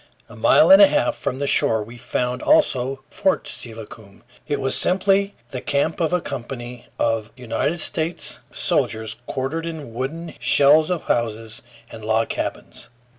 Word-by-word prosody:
A - - -14
mile - - +5
and 290 +1 +9
a 300 - +10
half 295 +1 +1
from 130 - -3
the 140 - -2
shore 110 -5 +2
we 115 +3 -12
found 125 +1 -3
also 135 - +2
Fort 195 -2 0
Steilacoom. 110 -3 -8 0.2
It 145 -2 -1
was 135 -1 0
simply 195 +2 +2 0.2
the 130 -2 -5
camp 145 +3 0
of 165 -1 +1
a 180 - +2
company 125 -4 -7
of 115 -1 -1
United 130 +7 -2
States 160 +2 -2
soldiers, 110 0 -1
quartered 145 +5 -3
in 155 -8 -7
wooden 155 +7 -5
shells 150 +3 +5
of 180 -3 -2
houses 115 -1 -2 0.3
and 110 - -10
log 110 +1 +1
cabins. 120 - -5
135 Hz, 155 wpm, -22 LUFS, 115-165 Hz, 0.3 s, a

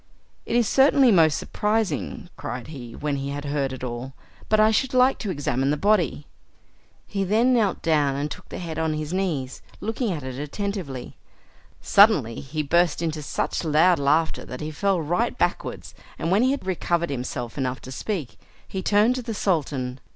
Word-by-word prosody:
"It - - -1
is 240 -3 +3
certainly 270 0 +5
most 160 -6 +5
surprising," 210 -3 -1
cried 125 +2 -6
he, 120 -6 -8
when 145 -1 -2
he 140 0 -4
had 145 +1 -5
heard 140 -2 -1
it 130 -1 -7
all, 125 +2 -5 0.4
"but 215 - +4
I 215 +1 +6
should 255 +4 0
like 255 +1 +4
to 210 - -4
examine 135 -5 0
the 150 - +1
body." 180 -5 +1 0.8
He 195 -1 -2
then 225 +7 +3
knelt 215 -6 +1
down, 150 -4 +2
and 145 +2 -3
took - - -9
the - - -6
head 165 -3 -5
on 160 -1 0
his 155 +2 -4
knees, 160 -9 -2 0.2
looking 225 +1 -2
at 155 -6 -4
it 130 0 -6
attentively. 150 -4 -5 0.6
Suddenly 180 - +4
he 150 +3 -4
burst 170 +2 +2
into 160 -2 -2
such 150 - -2
loud 165 +2 +4
laughter 150 +4 +1
that 125 - -8
he 155 0 -4
fell 195 +3 +1
right 175 +10 -1
backwards, - - -2 0.2
and 165 - -2
when 200 +4 +4
he 255 - +3
had 275 -7 -2
recovered 170 -3 0
himself 125 -2 -4
enough 130 -2 -2
to 130 - -9
speak, 160 - -4 0.3
he 190 - -4
turned 210 +5 +3
to 255 - -3
the 230 -2 -5
Sultan. 140 -10 -1
160 Hz, 185 wpm, -24 LUFS, 140-205 Hz, 0.8 s, I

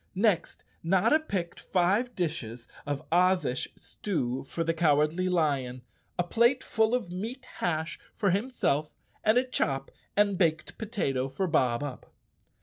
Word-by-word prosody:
Next, 200 -2 +1 0.2
Notta 190 - +4
picked 190 - -3
five 200 +7 +1
dishes 125 -9 -3 0.2
of 145 +1 -3
Ozish 180 -7 +2
stew 130 -11 -3
for 165 +4 -2
the 165 0 +1
Cowardly 160 +2 +2
Lion, 140 -8 0 0.3
a 175 - +2
plate 235 +8 +3
full 220 +1 +2
of 225 -8 -3
meat 230 +8 -5
hash 160 -1 -1 0.2
for 200 -4 +2
himself 190 - 0 0.3
and 215 +2 +4
a 250 - +5
chop 135 - -1 0.3
and 200 -2 +3
baked 160 -4 0
potato 140 - -1
for 140 +8 -1
Bob 130 -7 +2
Up. 140 -4 -7
175 Hz, 140 wpm, -29 LUFS, 145-205 Hz, 0.3 s, a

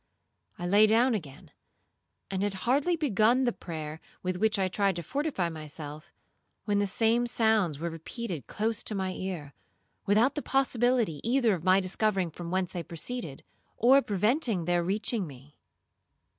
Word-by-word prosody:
I 175 - -5
lay 205 +4 +5
down 235 +4 +4
again, 155 -11 -6 0.8
and 190 -1 -1
had 205 -1 0
hardly 280 +8 +2
begun 245 - +2
the 245 - +2
prayer 155 -2 -7 0.2
with 185 0 -2
which 220 +2 +2
I 190 -1 +1
tried 195 +1 +1
to 170 - -4
fortify 275 - -1
myself, 155 +1 -8 0.5
when 205 -1 +1
the 205 - +1
same 230 +4 +2
sounds 220 - +2
were 170 +3 -3
repeated 165 - -6
close 220 0 -1
to 215 - -1
my 190 -1 -1
ear, 175 -8 -5 0.5
without 220 +7 +4
the 295 - -3
possibility 245 - +1
either 235 -2 +2
of 170 -4 -4
my 185 +1 +5
discovering 190 -1 0
from 170 +2 -7
whence 185 0 -1
they 175 - -4
proceeded, 170 - -4 0.3
or 265 +4 +6
preventing 210 - +1
their 175 0 +1
reaching 200 +2 -1
me. 140 +1 -14
195 Hz, 155 wpm, -29 LUFS, 175-235 Hz, 0.8 s, or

